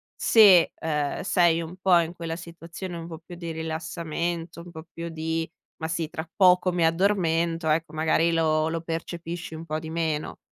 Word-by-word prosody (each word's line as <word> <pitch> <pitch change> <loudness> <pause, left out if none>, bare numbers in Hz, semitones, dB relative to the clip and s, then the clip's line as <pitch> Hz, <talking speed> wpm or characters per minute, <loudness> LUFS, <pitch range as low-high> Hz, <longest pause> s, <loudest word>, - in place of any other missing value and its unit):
se, 200 -6 +6
uhm, 150 -3 -1
sei 175 -3 +3
un 170 +3 -9
po' 185 -2 +5
in 170 0 -2
quella 165 -1 -4
situazione, 170 +1 -8
un 165 0 -7
po' 165 -1 -8
più 175 - -9
di 170 -1 -6
rilassamento, 165 +1 -4
un 175 - -11
po' 160 0 -10
più 170 0 -5
di 160 0 -3 0.3
"ma 160 - -1
sì, 160 -1 -2
tra 160 +1 -6
poco 180 -1 +5
mi 170 -2 +2
addormento". 165 -2 +1
Ecco, 160 +2 +1
magari, 160 +2 +2
lo 155 -1 +2
lo 165 0 -3
percepisci 165 0 -5
un 160 - -8
po' 155 -1 -3
di 160 - -8
meno. 160 -2 -2
165 Hz, 185 wpm, -26 LUFS, 160-170 Hz, 0.3 s, se